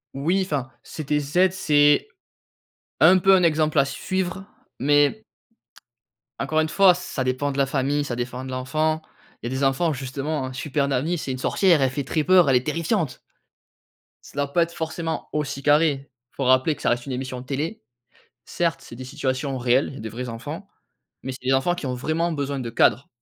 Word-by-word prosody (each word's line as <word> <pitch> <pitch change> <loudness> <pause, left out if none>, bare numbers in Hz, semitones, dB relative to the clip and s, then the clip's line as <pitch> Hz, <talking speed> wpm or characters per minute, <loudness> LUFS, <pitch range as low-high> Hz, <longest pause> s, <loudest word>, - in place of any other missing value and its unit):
Oui, 175 +8 +1
enfin, 135 -6 -3
CTZ, 150 +4 0
c'est 145 - +3 0.9
un 185 +3 +7
peu 195 +1 +6
un 180 - +3
exemple 155 -1 +2
à 140 - +5
suivre, 185 +5 -3 0.3
mais 145 - +3 1.2
encore 155 +3 0
une 155 0 +1
fois, 195 -1 +6
ça 175 -6 -4
dépend 130 +3 -1
de 135 - -6
la 140 - +3
famille, 140 +2 0
ça 125 -4 -4
défend 125 +1 -4
de 130 - -7
l'enfant. 155 +5 -1 0.4
Il 120 - -4
y - - -4
a - - -2
des 140 - -1
enfants 140 +4 +2
justement, 135 +1 -4
Super 140 +1 -1
Nanny, 150 +6 0
c'est 140 -4 -4
une 130 - -3
sorcière. 170 +3 +3
Elle 130 - +3
fait 140 +2 -3
très 150 +3 -1
peur. 180 -4 +5
Elle 130 - +5
est 125 - -3
terrifiante. 165 - -1 1.1
Ça - - -15
doit 140 0 -1
pas 170 - +4
être 170 0 -6
forcément 160 0 -4
aussi 145 -2 -2
carré. 145 -1 +2 0.2
Faut 135 - -4
rappeler 130 +4 +3
que 145 - -15
ça - - +1
reste 120 0 0
une 135 - -6
émission 130 0 -4
de 130 - -13
télé. 140 -1 -4 0.6
Certes, 170 -1 -1
c'est 120 - -11
des 130 - -8
situations 135 0 -3
réelles. 125 +2 +2
Il - - -8
y - - -8
a - - -9
des 110 - -5
vrais 125 +3 -6
enfants 145 - -7 0.6
mais 130 - -4
c'est 130 - -12
des 135 - +4
enfants 135 +7 +2
qui 165 -7 -5
ont 125 - -2
vraiment 160 +6 -1
besoin 140 -2 -3
de 120 -2 -4
cadre. 120 +2 +2
145 Hz, 200 wpm, -23 LUFS, 130-160 Hz, 1.2 s, un